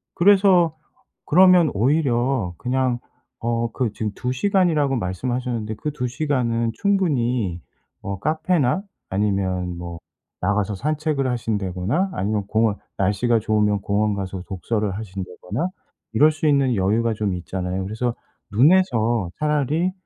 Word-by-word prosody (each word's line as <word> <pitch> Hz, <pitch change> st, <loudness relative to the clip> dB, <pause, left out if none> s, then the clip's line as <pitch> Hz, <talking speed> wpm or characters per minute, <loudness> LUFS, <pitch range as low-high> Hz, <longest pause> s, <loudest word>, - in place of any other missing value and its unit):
그래서 185 Hz, -3 st, +5 dB, 0.5 s
그러면 180 Hz, -1 st, +6 dB
오히려 120 Hz, -, +1 dB
그냥 130 Hz, -1 st, 0 dB, 0.4 s
어 115 Hz, 0 st, -1 dB
그 120 Hz, -4 st, -1 dB
지금 105 Hz, -1 st, -3 dB
2 125 Hz, +3 st, -2 dB
시간이라고 155 Hz, -3 st, +2 dB
말씀하셨는데 115 Hz, +2 st, -2 dB
그 150 Hz, -, -4 dB
2 125 Hz, -4 st, -3 dB
시간은 120 Hz, -4 st, 0 dB
충분히 125 Hz, -, 0 dB, 0.4 s
어 95 Hz, -1 st, -4 dB
카페나 155 Hz, -, +1 dB, 0.3 s
아니면 95 Hz, -3 st, -1 dB
뭐 85 Hz, -1 st, -7 dB, 0.4 s
나가서 105 Hz, 0 st, 0 dB
산책을 150 Hz, -, -1 dB
하신다거나 110 Hz, -, -1 dB
아니면 100 Hz, +1 st, -1 dB
공원 110 Hz, 0 st, +1 dB, 0.2 s
날씨가 105 Hz, +5 st, +2 dB
좋으면 105 Hz, -1 st, +1 dB
공원 105 Hz, +1 st, +1 dB
가서 95 Hz, -2 st, -4 dB
독서를 105 Hz, +2 st, -2 dB
하신다거나 100 Hz, -, -4 dB, 0.4 s
이럴 150 Hz, +8 st, +5 dB
수 155 Hz, +1 st, -2 dB
있는 140 Hz, -4 st, +3 dB
여유가 110 Hz, +4 st, +1 dB
좀 105 Hz, -3 st, -1 dB
있잖아요. 90 Hz, +1 st, -3 dB
그래서 110 Hz, +4 st, -2 dB, 0.4 s
'눈에서 120 Hz, -, +3 dB
차라리 150 Hz, +4 st, +1 dB
115 Hz, 290 characters per minute, -22 LUFS, 100-145 Hz, 0.5 s, 그러면